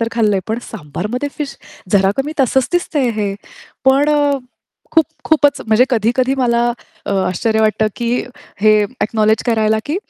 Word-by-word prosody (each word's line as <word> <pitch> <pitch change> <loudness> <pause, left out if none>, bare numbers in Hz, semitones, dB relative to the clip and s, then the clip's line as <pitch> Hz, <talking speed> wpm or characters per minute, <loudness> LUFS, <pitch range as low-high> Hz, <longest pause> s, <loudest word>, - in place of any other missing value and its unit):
तर 230 - 0
खाल्लंय, 210 -4 +2
पण 220 - -1
सांबारमध्ये 210 - -4
फिश. 290 -2 -4 0.4
जरा 195 -1 +4
कमी 280 +3 -2
तसंच 265 0 +2
दिसतंय 305 -7 0
हे. 205 -2 -1 0.5
पण 275 +2 +4 0.8
खूप 325 -2 +5 0.2
खूपच 290 -3 +3
म्हणजे 220 +3 +4
कधी-कधी 245 +3 +1
मला 240 -2 +1 0.5
आश्चर्य 220 +5 0
वाटतं, 215 0 +2
की 235 0 -1 0.5
हे 215 0 +5
अ‍ॅकनॉलेज 220 -2 0
करायला, 220 -2 +2
की 300 +4 -1
235 Hz, 135 wpm, -17 LUFS, 215-265 Hz, 0.8 s, खूप